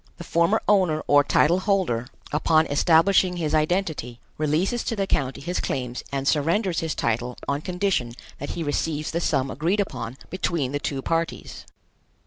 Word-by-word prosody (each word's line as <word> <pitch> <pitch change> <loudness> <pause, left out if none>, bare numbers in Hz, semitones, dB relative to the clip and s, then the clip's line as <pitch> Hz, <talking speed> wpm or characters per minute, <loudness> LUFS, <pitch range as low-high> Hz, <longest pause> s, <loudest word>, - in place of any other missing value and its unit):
The 175 - -8
former 170 +6 +2
owner 185 -7 +3
or 145 0 +5
title 165 +5 +3
holder, 185 - 0 0.2
upon 155 +1 +3
establishing 175 +5 +3
his 160 -3 -2
identity, 155 -7 0 0.2
releases 160 +10 0
to 225 - -1
the 200 -2 0
county 135 -8 -1
his 175 +5 -2
claims 125 -2 -3
and 135 0 -2
surrenders 170 +5 +1
his 160 -1 -2
title 120 +2 -1
on 140 +1 -1
condition 180 -9 -1 0.3
that 145 - -5
he 170 - -2
receives 150 +1 -2
the 170 - -1
sum 135 -5 0
agreed 170 +8 0
upon 125 - -3
between 170 -7 -1
the 145 - -1
two 135 -2 -3
parties. 165 0 -3
155 Hz, 160 wpm, -24 LUFS, 140-180 Hz, 0.3 s, or